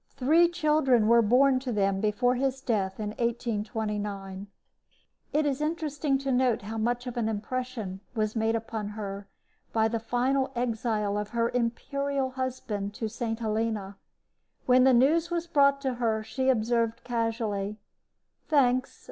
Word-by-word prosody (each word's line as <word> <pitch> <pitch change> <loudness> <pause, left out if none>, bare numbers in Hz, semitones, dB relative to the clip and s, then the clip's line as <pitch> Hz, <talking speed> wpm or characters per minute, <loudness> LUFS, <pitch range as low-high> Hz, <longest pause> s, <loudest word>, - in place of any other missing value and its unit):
Three 315 +6 +4
children 300 -9 +2
were 235 +1 +6
born 255 +4 +4
to 255 -1 -4
them 195 -2 +1
before 220 +4 +2
his 265 +1 -1
death 205 -7 -1
in 210 -1 -2
1829. 210 -4 -3 0.8
It 300 +1 +1
is 285 0 -1
interesting 300 -3 -1
to 275 0 -2
note 250 -4 +2
how 220 +2 -4
much 240 +3 -1
of 245 -1 -6
an 225 -2 0
impression 220 -2 -4 0.2
was 215 0 -1
made 225 0 +1
upon 225 -2 -4
her 200 -1 -5 0.4
by 220 -1 +2
the 230 +1 -2
final 260 +4 0
exile 220 -4 -1
of 210 0 -4
her 235 0 0
imperial 265 +3 -1
husband 245 -6 -4
to 225 - -3
St. 225 +1 -3
Helena. 215 -3 -2 0.7
When 255 0 +5
the 265 - +6
news 315 +7 +3
was 340 -1 -1
brought 280 -4 +3
her 235 -4 0
she 260 +4 -1
observed, 230 -1 +1
casually: 225 -4 -2 0.7
"Thanks. 255 -4 +2
235 Hz, 145 wpm, -28 LUFS, 215-265 Hz, 0.8 s, were